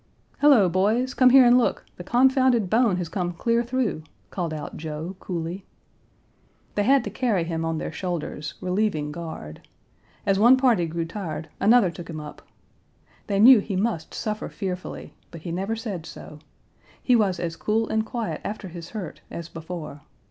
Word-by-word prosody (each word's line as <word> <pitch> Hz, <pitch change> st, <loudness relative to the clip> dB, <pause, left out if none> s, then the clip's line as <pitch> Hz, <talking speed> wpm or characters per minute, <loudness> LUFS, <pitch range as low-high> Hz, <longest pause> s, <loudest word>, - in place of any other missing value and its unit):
"Hello, 275 Hz, -10 st, +6 dB
boys! 215 Hz, +9 st, +1 dB
come 255 Hz, -1 st, +5 dB
here 260 Hz, 0 st, +8 dB
and 245 Hz, +1 st, +6 dB
look: 245 Hz, -, 0 dB
the 175 Hz, -, -7 dB
confounded 250 Hz, -2 st, +3 dB
bone 225 Hz, -3 st, +3 dB
has 180 Hz, -2 st, -3 dB
come 175 Hz, +1 st, -3 dB
clear 230 Hz, +6 st, +1 dB
through," 240 Hz, -8 st, -1 dB, 0.3 s
called 175 Hz, -4 st, -3 dB
out 155 Hz, -1 st, -6 dB
Joe, 160 Hz, +4 st, -6 dB
coolly. 175 Hz, +1 st, -5 dB, 1.1 s
They 205 Hz, -, 0 dB
had 270 Hz, +5 st, +4 dB
to -, -, -5 dB
carry 225 Hz, -9 st, 0 dB
him 165 Hz, -1 st, -3 dB
on 165 Hz, 0 st, -1 dB
their -, -, -4 dB
shoulders, 170 Hz, -4 st, -4 dB
relieving 185 Hz, -5 st, -1 dB
guard. 160 Hz, -, -8 dB, 0.6 s
As 195 Hz, -1 st, +2 dB
one 240 Hz, +5 st, +7 dB
party 235 Hz, -10 st, +3 dB
grew 165 Hz, +1 st, -3 dB
tired, 165 Hz, -3 st, -6 dB
another 220 Hz, -4 st, +5 dB
took 175 Hz, 0 st, -10 dB
him 160 Hz, -2 st, -5 dB
up. 150 Hz, -1 st, -9 dB, 0.9 s
They 200 Hz, -1 st, 0 dB
knew 245 Hz, +2 st, +9 dB
he 200 Hz, -1 st, -4 dB
must 190 Hz, -4 st, -2 dB
suffer 215 Hz, -1 st, -3 dB
fearfully, 185 Hz, -3 st, -6 dB, 0.2 s
but 165 Hz, -, -10 dB
he 170 Hz, -, -5 dB
never 195 Hz, +6 st, -2 dB
said 205 Hz, -8 st, -5 dB
so. 150 Hz, -, -11 dB, 0.6 s
He 250 Hz, -, +3 dB
was 195 Hz, -6 st, +2 dB
as 165 Hz, -2 st, -3 dB
cool 220 Hz, +4 st, 0 dB
and 220 Hz, 0 st, 0 dB
quiet 230 Hz, 0 st, -4 dB
after 205 Hz, -2 st, -5 dB
his 170 Hz, 0 st, -9 dB
hurt 205 Hz, -7 st, -7 dB
as 170 Hz, 0 st, -7 dB
before. 160 Hz, -3 st, -7 dB
190 Hz, 170 wpm, -24 LUFS, 165-230 Hz, 1.1 s, knew